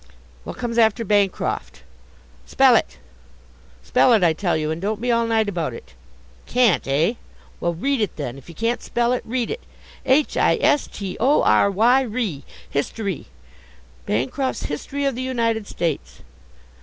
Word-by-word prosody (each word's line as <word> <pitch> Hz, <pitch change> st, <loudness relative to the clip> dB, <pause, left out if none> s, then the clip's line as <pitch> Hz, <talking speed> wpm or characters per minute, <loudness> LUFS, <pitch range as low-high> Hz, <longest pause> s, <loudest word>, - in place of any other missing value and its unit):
What -, -, -7 dB
comes 235 Hz, -1 st, -2 dB
after 225 Hz, 0 st, +3 dB
Bancroft? 200 Hz, -2 st, -1 dB, 0.6 s
Spell 265 Hz, -2 st, +5 dB
it! -, -, 0 dB, 0.9 s
Spell 250 Hz, -, +4 dB
it, 215 Hz, -5 st, +4 dB
I 165 Hz, -2 st, +4 dB
tell 175 Hz, 0 st, 0 dB
you, 155 Hz, 0 st, -2 dB
and 160 Hz, +2 st, -4 dB
don't 210 Hz, +2 st, -2 dB
be 245 Hz, +2 st, 0 dB
all 230 Hz, 0 st, +2 dB
night 220 Hz, -1 st, +1 dB
about 165 Hz, -11 st, -2 dB
it! 65 Hz, -, -13 dB, 0.5 s
Can't, 240 Hz, -, +2 dB
eh? 150 Hz, +10 st, +2 dB, 0.5 s
Well, 170 Hz, 0 st, -1 dB
read 270 Hz, +8 st, 0 dB
it 210 Hz, -, -1 dB
then; 135 Hz, -5 st, -5 dB
if 135 Hz, +2 st, -14 dB
you 170 Hz, -, -11 dB
can't 230 Hz, +5 st, -1 dB
spell 240 Hz, +1 st, 0 dB
it, 250 Hz, -, -1 dB
read 240 Hz, 0 st, -2 dB
it. 475 Hz, -, -5 dB, 0.4 s
H 270 Hz, +3 st, +2 dB
i -, -, +4 dB
s 290 Hz, -, +2 dB
t 195 Hz, -3 st, -6 dB
o 270 Hz, +6 st, +3 dB
r 200 Hz, -, +4 dB
y 235 Hz, +7 st, +4 dB
ry, 215 Hz, -, -3 dB, 0.3 s
history; 195 Hz, +6 st, -3 dB, 0.8 s
Bancroft's 135 Hz, -, -1 dB
History 280 Hz, -, -4 dB
of 275 Hz, -, +1 dB
the 245 Hz, -, -5 dB
United 230 Hz, -4 st, -1 dB
States! 140 Hz, -, -4 dB
220 Hz, 165 wpm, -22 LUFS, 170-245 Hz, 0.9 s, Spell